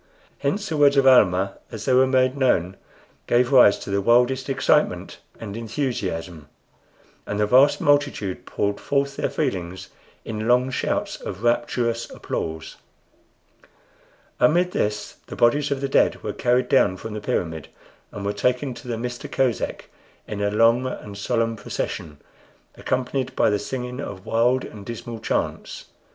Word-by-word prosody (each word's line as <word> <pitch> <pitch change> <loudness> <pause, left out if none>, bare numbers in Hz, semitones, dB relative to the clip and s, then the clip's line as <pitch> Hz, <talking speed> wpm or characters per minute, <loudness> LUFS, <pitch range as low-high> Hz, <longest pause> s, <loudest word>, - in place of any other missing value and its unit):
Hence 205 +1 -1
the 160 - -2
words 145 -1 +5
of 135 - +4
Almah, 100 -7 +4
as 110 -2 -7
they 130 - +2
were 130 +1 +5
made 130 0 +2
known, 95 -10 +1 0.5
gave 120 +1 +2
rise 125 -7 +7
to - - -8
the 100 0 +1
wildest 125 +5 +3
excitement 135 - +1 0.2
and 105 -3 -7
enthusiasm, 95 - -4 0.8
and 100 - -3
the 105 - +3
vast 130 +6 +5
multitude 145 -10 0
poured 100 0 -1
forth 140 0 -1
their - - -1
feelings 90 0 -3 0.4
in 110 0 -4
long 125 +2 +3
shouts - - -2
of 95 +5 -7
rapturous 120 0 0
applause. 80 0 -5 1.6
Amid 175 +3 +3
this 105 -7 -2
the - - -7
bodies 145 +5 +3
of 140 -1 -2
the 140 - 0
dead - - +2
were - - -3
carried 125 +1 +1
down 100 -9 +3
from 110 +3 -7
the 105 - -5
pyramid, 80 -6 -2 0.4
and 100 - -7
were 100 - -1
taken 125 +5 0
to 125 - -12
the 120 -2 -2
Mista 120 +1 -5
Kosek 130 -3 -1 0.4
in 105 -1 -5
a 100 - +1
long 115 +4 +3
and 105 -5 -7
solemn 115 +2 -1
procession, 75 -7 -5 0.6
accompanied 130 +1 -2
by - - +3
the 105 - +1
singing 125 +3 -5
of 100 -8 -7
wild 120 +3 +2
and 105 -2 -10
dismal 115 +1 -7
chants. - - -3
120 Hz, 155 wpm, -23 LUFS, 100-130 Hz, 1.6 s, rise